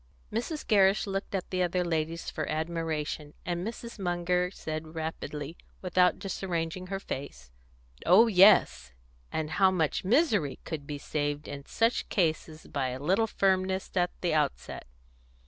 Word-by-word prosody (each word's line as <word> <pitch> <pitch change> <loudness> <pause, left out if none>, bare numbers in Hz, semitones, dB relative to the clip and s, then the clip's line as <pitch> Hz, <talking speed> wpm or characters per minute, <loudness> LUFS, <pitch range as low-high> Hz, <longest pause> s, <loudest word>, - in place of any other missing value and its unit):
Mrs. 270 +8 -3
Gerrish 200 -1 +4
looked 195 0 -3
at 185 - -4
the 185 -1 0
other 180 0 +1
ladies 165 0 -2
for 155 - -3
admiration, 155 -2 -3
and 175 0 -2
Mrs. 235 +1 -7
Munger 180 0 0
said, 155 -3 -6
rapidly, 155 -1 -5 0.3
without 180 0 +3
disarranging 185 -2 -3
her 195 +1 -3
face 65 - -7 0.5
"Oh 190 +7 +7
yes. 195 - +5 0.4
And 155 -1 -2
how 190 +4 +4
much 165 -5 0
misery 210 - +2
could 145 -3 -6
be 145 - -4
saved 145 0 -3
in 140 -1 -8
such 230 +2 +1
cases 160 -4 -1
by 140 -2 -2
a 130 0 -4
little 190 +10 +2
firmness 190 -2 +1
at 180 -1 +2
the 175 - +1
outset!" 65 - -1
175 Hz, 145 wpm, -29 LUFS, 155-190 Hz, 0.5 s, Oh